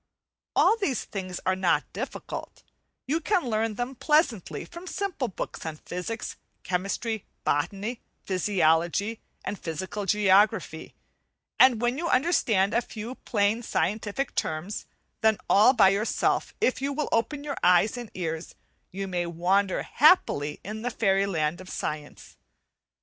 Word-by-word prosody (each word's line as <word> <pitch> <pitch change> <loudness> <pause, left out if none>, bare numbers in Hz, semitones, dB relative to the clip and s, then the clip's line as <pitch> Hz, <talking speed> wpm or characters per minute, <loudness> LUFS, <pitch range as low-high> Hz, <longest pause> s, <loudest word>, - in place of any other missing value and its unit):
All 450 - +5
these 320 - -1
things 185 -3 -5
are 185 - +2
not 190 -2 +1
difficult, - - -6 0.4
you 305 +5 0
can 370 0 +1
learn 220 -1 0
them 245 +4 -3
pleasantly 275 - +1
from 345 +2 -10
simple 370 -10 -2
books 195 - -6
on 160 -2 -5
physics, 180 +8 -5 0.3
chemistry, 195 +4 -2 0.2
botany, 200 +11 -1 0.2
physiology, 185 +2 +1 0.3
and 205 - -4
physical 190 +5 -4
geography; 205 0 +2 0.6
and 245 -3 +6
when 240 +4 +1
you 340 0 -1
understand 230 - +2
a 235 - +3
few 225 +1 -7
plain 215 -2 0
scientific 215 +6 -1
terms, 160 +6 -3 0.3
then 220 -1 +4
all 210 +5 +6
by 205 -7 +6
yourself, 200 +3 0
if 255 - +1
you 280 +1 -1
will 300 +1 -2
open 285 +5 0
your 290 -1 -4
eyes 180 +5 +4
and 240 -3 -7
ears, 165 -2 -4 0.4
you 195 +1 -4
may 175 -2 -2
wander 185 +4 +1
happily 240 - +3
in 215 +2 -6
the 245 - -1
fairy 195 -4 +2
land 160 -2 -1
of 185 - -11
science. 150 -1 -6
205 Hz, 140 wpm, -27 LUFS, 185-245 Hz, 0.6 s, and